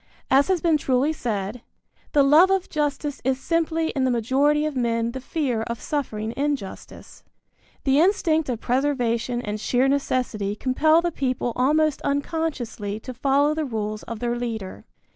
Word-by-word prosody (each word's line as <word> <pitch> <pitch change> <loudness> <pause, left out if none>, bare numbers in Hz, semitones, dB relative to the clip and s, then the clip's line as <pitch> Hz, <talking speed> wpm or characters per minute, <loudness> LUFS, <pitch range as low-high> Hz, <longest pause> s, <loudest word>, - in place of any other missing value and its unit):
As 275 +2 +5
has 375 -3 +1
been 325 -2 +3
truly 275 +2 +1
said: 220 -4 -3 0.5
"The 290 -2 +5
love 305 +7 +6
of 385 -1 0
justice 295 -1 -2
is 260 +1 0
simply 330 +1 0
in 270 - -1
the 260 - +2
majority 270 +6 +2
of 305 -2 -3
men 230 -2 0
the 260 - -6
fear 265 -5 -1
of 235 0 -4
suffering 225 -7 -3
injustice." 280 -8 -5 0.6
The 270 +1 +3
instinct 320 -4 +2
of 240 -3 -2
preservation 245 -2 0
and 210 -1 -4
sheer 250 +4 +2
necessity 250 -7 -1
compel 310 +8 +3
the 345 - 0
people 255 -5 -2
almost 300 +3 +2
unconsciously 280 -8 -2
to 255 +3 -8
follow 280 +4 +2
the 315 0 -2
rules 215 -5 -3
of 230 - -7
their 240 +2 -1
leader. 225 -5 -5
265 Hz, 160 wpm, -24 LUFS, 235-300 Hz, 0.6 s, love